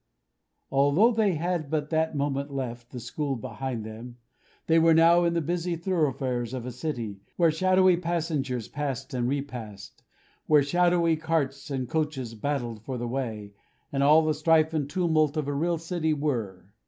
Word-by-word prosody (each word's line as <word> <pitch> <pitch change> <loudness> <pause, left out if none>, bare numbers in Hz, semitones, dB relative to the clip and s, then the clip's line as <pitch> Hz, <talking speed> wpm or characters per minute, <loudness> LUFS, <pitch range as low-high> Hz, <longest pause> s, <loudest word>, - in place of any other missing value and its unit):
Although 145 - +4
they 215 -5 +2
had 170 -2 -2
but 150 0 -2
that 160 -1 +1
moment 140 0 -1
left 120 -3 -5
the 125 - -7
school 140 +3 -3
behind 125 -1 -5
them, 115 +3 -9 0.5
they 165 0 +4
were 165 0 +5
now 170 +2 +5
in 170 0 +1
the 170 - +1
busy 175 +2 -1
thoroughfares 135 - -1
of 125 -2 -5
a 125 - -4
city, 120 -6 -4 0.2
where 170 -2 +4
shadowy 185 +2 +4
passengers 155 - -2
passed 135 -3 -4
and 125 -1 0
repassed; 115 -8 -6 0.5
where 150 -2 +5
shadowy 175 +1 +2
carts 150 -3 -2
and 130 -3 -2
coaches 145 -6 -2
battled 120 -2 -3
for 130 +3 -5
the 120 0 -3
way, 110 -5 -4 0.4
and 140 -1 -1
all 150 +3 +6
the 155 - +2
strife 160 +1 +3
and 145 -3 -1
tumult 160 -3 +1
of 150 -2 -1
a 145 - -1
real 170 +4 0
city 165 -1 -1
were. 110 -10 -3
145 Hz, 165 wpm, -27 LUFS, 125-165 Hz, 0.5 s, all